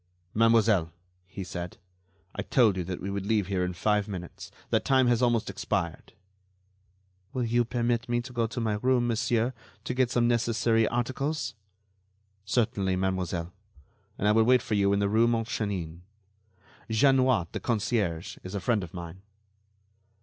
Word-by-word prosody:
"Mademoiselle," 110 -6 +3 0.4
he 95 +1 -7
said, 90 -1 -6 0.6
"I - - -3
told 115 -7 +3
you 90 - -2
that 90 0 -4
we 100 - -4
would 100 0 -3
leave 105 -3 +2
here 95 -1 -1
in 90 0 -2
five 105 +3 +1
minutes. 90 -4 -7 0.2
That - - +2
time 130 -1 +3
has 120 0 +2
almost 120 -3 +2
expired." 90 -6 -3 1.2
"Will 130 - -1
you 120 +1 +2
permit 120 0 -1
me 120 0 +1
to 125 +1 -10
go 115 -2 0
to 120 - -5
my 110 -3 -1
room, 125 -1 +2
monsieur, 120 +1 0 0.3
to - - -3
get 125 -1 +2
some 120 -1 +2
necessary 115 -1 +2
articles?" 130 +6 -2 0.9
"Certainly, 100 -4 0
mademoiselle; 90 -2 -2 0.6
and 105 - 0
I - - +5
will 110 +1 +5
wait 125 +2 +4
for 120 - -3
you 100 -1 +3
in 100 - +2
the 100 0 +1
rue 110 +3 +3
Montchanin. 105 -8 -2 0.9
Jeanniot, 130 - +3
the - - -4
concierge, 105 -7 -1
is 95 +2 -7
a - - -1
friend 105 0 0
of 90 0 -9
mine." 85 +1 -8
110 Hz, 160 wpm, -28 LUFS, 95-120 Hz, 1.2 s, I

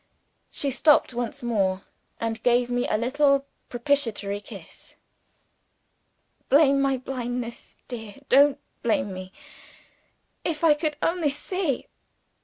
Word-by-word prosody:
She 280 - -2
stopped 290 0 +4
once 240 0 -4
more, 195 -5 0 0.4
and 225 0 -3
gave 245 0 +2
me 245 0 0
a - - +1
little 275 +4 +2 0.2
propitiatory 235 -6 -1
kiss. - - -13 1.5
"Blame 280 -1 +5
my 270 -1 +2
blindness, 245 -2 -5
dear, 225 -4 -7
don't 280 +1 +5 0.2
blame 205 -4 0
me. 185 0 -8 1.1
If 325 -2 -3
I 320 -2 +7
could 295 0 -2
only 335 -3 +1
see 295 +1 -2
250 Hz, 110 wpm, -25 LUFS, 230-285 Hz, 1.5 s, I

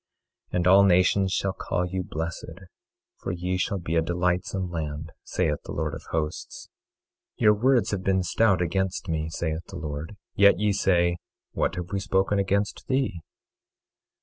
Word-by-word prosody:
24:12 - - -6
And 90 0 +2
all 95 +2 +7
nations 95 +1 +4
shall 95 0 0
call 90 - -2
you 95 +1 -3
blessed, 80 -1 -5 0.6
for - - -4
ye 90 +1 -2
shall 95 +2 -1
be 85 -2 -3
a 80 - +4
delightsome 90 +2 -1
land, 75 -1 -4
saith 75 -1 -1
the - - -8
Lord 75 -1 -2
of - - -8
Hosts. 75 -1 -4 0.7
24:13 - - -17
Your 105 - +7
words 125 +3 +2
have 95 -2 -2
been 95 -1 +2
stout 95 0 +2
against 95 +3 -1
me, 80 -1 -1
saith 80 0 -3
the 95 - -8
Lord. 75 +3 -5 0.2
Yet 100 -2 +6
ye 105 +1 +1
say: 85 -3 +2 0.3
What - - -1
have 90 0 -5
we 100 - 0
spoken 95 +1 +1
against 100 +1 -1
thee? 130 -10 0
90 Hz, 170 wpm, -26 LUFS, 85-95 Hz, 0.7 s, all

